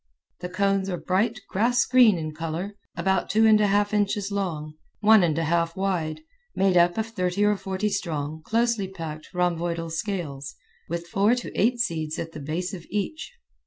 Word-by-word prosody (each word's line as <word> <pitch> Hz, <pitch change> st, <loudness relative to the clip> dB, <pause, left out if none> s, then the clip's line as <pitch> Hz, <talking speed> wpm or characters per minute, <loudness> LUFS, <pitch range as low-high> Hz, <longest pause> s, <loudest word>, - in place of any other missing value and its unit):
The 180 Hz, 0 st, -5 dB
cones 195 Hz, +1 st, +1 dB
are 180 Hz, -, -2 dB
bright 215 Hz, +6 st, 0 dB
grass 235 Hz, +5 st, +2 dB
green 245 Hz, -6 st, +5 dB
in 155 Hz, -1 st, -4 dB
color, 165 Hz, +6 st, -4 dB, 0.2 s
about 190 Hz, -1 st, 0 dB
two 220 Hz, +2 st, +4 dB
and 215 Hz, -1 st, +6 dB
a 210 Hz, -, +4 dB
half 205 Hz, +1 st, +2 dB
inches 205 Hz, -1 st, 0 dB
long, 165 Hz, -7 st, -3 dB, 0.3 s
one 215 Hz, 0 st, +6 dB
and 165 Hz, -3 st, +1 dB
a 165 Hz, -, +1 dB
half 165 Hz, +1 st, 0 dB
wide, 185 Hz, -, -1 dB, 0.3 s
made 195 Hz, -1 st, +2 dB
up 175 Hz, +1 st, +4 dB
of 220 Hz, -, 0 dB
thirty 190 Hz, -2 st, 0 dB
or 210 Hz, 0 st, +3 dB
forty 195 Hz, +1 st, -2 dB
strong, 155 Hz, -5 st, -3 dB
closely 230 Hz, +1 st, 0 dB
packed, 160 Hz, -5 st, -8 dB
rhomboidal 170 Hz, -2 st, -1 dB
scales, 160 Hz, -7 st, -4 dB, 0.3 s
with 170 Hz, +1 st, -3 dB
four 200 Hz, +7 st, +2 dB
to 245 Hz, -, -5 dB
eight 240 Hz, +5 st, +2 dB
seeds 160 Hz, -7 st, -1 dB
at 165 Hz, -, -5 dB
the 155 Hz, -, -8 dB
base 160 Hz, +6 st, -3 dB
of 175 Hz, -3 st, -7 dB
each. 210 Hz, -, -3 dB
185 Hz, 180 wpm, -25 LUFS, 165-205 Hz, 0.3 s, and